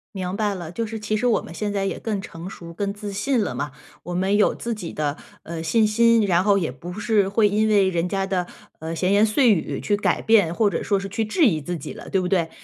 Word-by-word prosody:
明 185 0 -3
白 205 -1 0
了， 170 -3 -7
就 230 +6 -2
是 220 0 -6
其 215 0 -2
实 245 - +1
我 235 - +2
们 165 - -10
现 205 +4 -3
在 200 -1 -1
也 195 - -3
更 210 -3 -3
成 170 0 -8
熟、 170 -3 -10
更 200 +3 -2
自 205 0 -6
信 250 +6 0
了 - - -2
嘛， 145 -1 -4 0.3
我 175 - -5
们 190 +3 +1
有 210 - +3
自 235 - -3
己 195 -6 -6
的， 150 -1 -2 0.3
呃， 165 0 -6
信 215 +7 +2
心， 230 +1 +4
然 180 -2 +2
后 200 0 +4
也 165 -8 -1
不 165 +8 -9
是 210 -1 +1
会 210 +1 +3
因 215 +2 +2
为 200 -3 +4
人 170 -1 -1
家 195 0 -1
的， 185 -2 -1 0.3
呃， 160 +1 -5
闲 185 +3 0
言 205 +2 +5
碎 225 +1 +4
语 170 - -2
去 205 - 0
改 210 - 0
变， 205 -7 +4
或 215 +1 +3
者 175 - -2
说 200 -2 +1
是 195 - -5
去 220 +3 -1
质 320 - +1
疑 165 - +2
自 175 +4 -4
己 145 - -7
了， - - -10
对 190 - +1
不 180 - -1
对？ 175 -3 +1
200 Hz, 290 characters per minute, -23 LUFS, 175-215 Hz, 0.3 s, 言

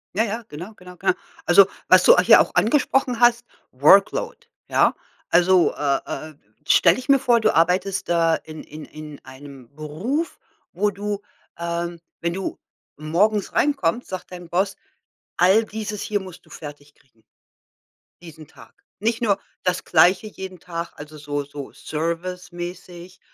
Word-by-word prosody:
Ja, 220 - +3
ja, 230 +2 -4
genau, 175 +9 -9
genau, 180 -1 -13
genau. 370 - +1 0.3
Also - - +7 0.2
was - - +6
du - - +8
hier - - +7
auch - - +2
angesprochen 250 0 +1
hast, 240 0 +4 0.3
Workload, 155 +10 +4 0.3
ja? - - +3 0.4
Also, 180 0 +4
äh, 140 -2 0 0.3
äh, 155 - -17 0.3
stelle - - +5
ich 255 - -11
mir 275 - +7
vor, 245 -3 +3
du - - +2
arbeitest 180 +4 +1
da 165 -1 +3
in 155 0 -9
in 155 +1 -10
in 150 -2 -11
einem 130 -1 -13
Beruf, 185 - -3 0.3
wo 205 +4 0
du 205 0 -4 0.4
ähm, 170 0 -4 0.2
wenn 170 0 -1
du 190 +1 -5 0.4
morgens 190 +7 0
reinkommt, 245 - +1
sagt 185 -1 -8
dein 175 -2 -10
Boss: 190 +3 0 0.6
„All 190 +6 +4
dieses 210 -1 -5
hier 205 -1 -1
musst 185 -3 -12
du - - -22
fertig 145 -1 -11
kriegen“ 115 -6 -32 1.0
„diesen 160 -3 -12
Tag.“ - - -19 0.2
Nicht 225 +2 -1
nur 205 -4 +1 0.2
das 180 - -1
Gleiche 180 +6 +4
jeden 190 -3 -9
Tag, 170 -1 -6
also 150 +1 -11
so 145 -1 -4
so 140 0 -9
service-mäßig, 175 +2 -6
180 Hz, 150 wpm, -22 LUFS, 155-205 Hz, 1.0 s, du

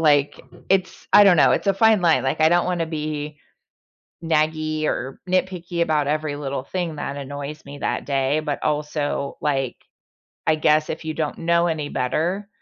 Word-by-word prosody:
like, 145 -3 +3 0.3
it's, 190 -1 0
I 205 - +9
don't 180 -3 +6
know, 145 - +5
it's - - -1
a 195 - +3
fine 220 0 +4
line. 165 -2 +4
Like 135 +4 -1
I 160 - +6
don't 175 +1 +3
want 180 -1 -1
to 165 - 0
be 150 -1 -4 0.9
naggy 155 -1 0
or 135 -2 -3
nitpicky 180 -2 -1
about 150 -3 +1
every 150 -1 -1
little 140 -2 -4
thing 170 -1 -3
that 140 -1 -4
annoys 145 +2 -6
me 140 0 -9
that - - -2
day, 140 +2 +1
but 150 -2 -4
also, 150 -1 -2
like, 135 -5 -1 0.7
I 160 - +4
guess 155 0 +2
if 160 - -5
you 155 -1 -3
don't 155 -2 -3
know 170 +1 +2
any 150 -3 -2
better, 175 +10 -1
155 Hz, 180 wpm, -22 LUFS, 145-170 Hz, 0.9 s, I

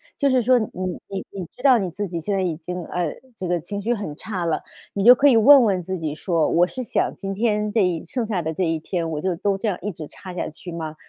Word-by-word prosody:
就 280 - +2
是 255 -1 +3
说 250 +2 +4
你 220 - -3 0.4
你 195 -1 -5
你 190 -3 -5
知 - - -13
道 265 -4 +7
你 190 -3 -2
自 205 +4 -3
己 170 -2 -4
现 200 +5 -1
在 195 - +1
已 175 -4 -1
经， 180 +2 -6
呃， 175 -3 -2 0.2
这 185 - -5
个 175 0 +1
情 200 +5 -5
绪 235 +4 +1
很 175 -8 -5
差 185 -2 -4
了， 165 - 0 0.3
你 200 - -1
就 245 - +10
可 285 +3 +4
以 240 -5 +6
问 275 +4 +8
问 195 -5 +1
自 185 +2 -4
己 155 -3 -3
说： 165 -2 +1
“我 175 +1 +4
是 255 - -6
想 - - 0
今 195 0 -5
天 210 0 0
这 215 -3 +3
一 175 -3 0
剩 240 +6 -3
下 195 -5 -1
的 160 +1 -2
这 185 - -1
一 165 -2 0
天 165 +1 -3
我 150 -1 -3
就 185 -2 0
都 195 +3 0
这 215 +3 -3
样 190 - 0
一 205 - -3
直 160 -4 -8
差 185 +3 -10
下 - - -2
去 170 +3 -10
吗？ 160 -2 -5
190 Hz, 305 characters per minute, -23 LUFS, 170-210 Hz, 0.4 s, 就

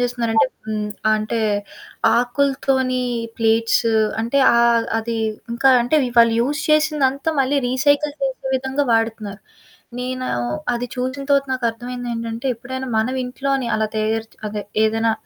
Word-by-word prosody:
జేస్తున్నారంటే. 230 -6 +1 0.2
హ్మ్, 210 -1 -2 0.3
అంటే, 215 +2 -2 0.8
ఆకులతోనీ 260 0 +1 0.4
ప్లేట్స్ 230 +1 +2 0.4
అంటే, 235 +5 0 0.2
ఆహ్, 235 -1 +4
అది 230 +1 -3 0.4
ఇంకా 265 +3 +4
అంటే, 275 +6 +1
వి 245 - -3
వాళ్ళు 230 -1 +6
యూజ్ 295 +4 -1
చేసిందంతా 300 -1 +2
మళ్ళీ 270 +2 +1
రీసైకిల్ 285 +3 +2
చేసే 265 0 -3
విధంగా 265 +2 -1
వాడతున్నారు. 225 -3 -1 0.6
నేనూ 255 0 -3 0.5
అది 240 +1 -3
చూసిన 255 +2 -3
తర్వాత 280 -1 +3
నాకర్థమైందేంటంటే, 235 -1 -3
ఎప్పుడైనా 260 +3 -6
మనవింట్లోనే 255 +2 -1
అలా 220 - 0
తయారు 220 +1 -1
చ్ - - -23
అదే 205 0 -4 0.2
ఏదైనా 225 +1 +1
245 Hz, 120 wpm, -20 LUFS, 225-265 Hz, 0.8 s, వాళ్ళు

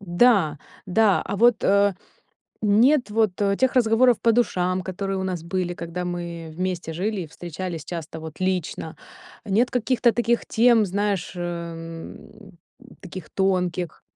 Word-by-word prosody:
Да, 180 -4 +3 0.3
да, 200 +2 +3
а 200 - -3
вот, 235 +2 +4
э, 200 0 +4 0.7
нет 235 +6 +4
вот, 215 -1 +2 0.3
тех 260 0 +2
разговоров 240 0 +4
по 230 - +4
душам, 185 -6 +1
которые 195 +1 -3
у - - -2
нас 180 -3 -3
были, 175 0 -2
когда 170 +1 -5
мы 170 -2 -5
вместе 180 -2 -3
жили 195 +3 -2
и 165 - -6
встречались 170 0 -6
часто 160 -1 -7
вот 160 -1 -9
лично. 185 -3 -2 0.5
Нет 220 +5 +2
каких-то 245 -1 +2
таких 240 0 0
тем, 230 -2 +4
знаешь, 200 -1 -1
э, 170 -1 -6 0.9
таких 180 -4 -9
тонких. 180 -3 -1
185 Hz, 135 wpm, -24 LUFS, 175-220 Hz, 0.9 s, вот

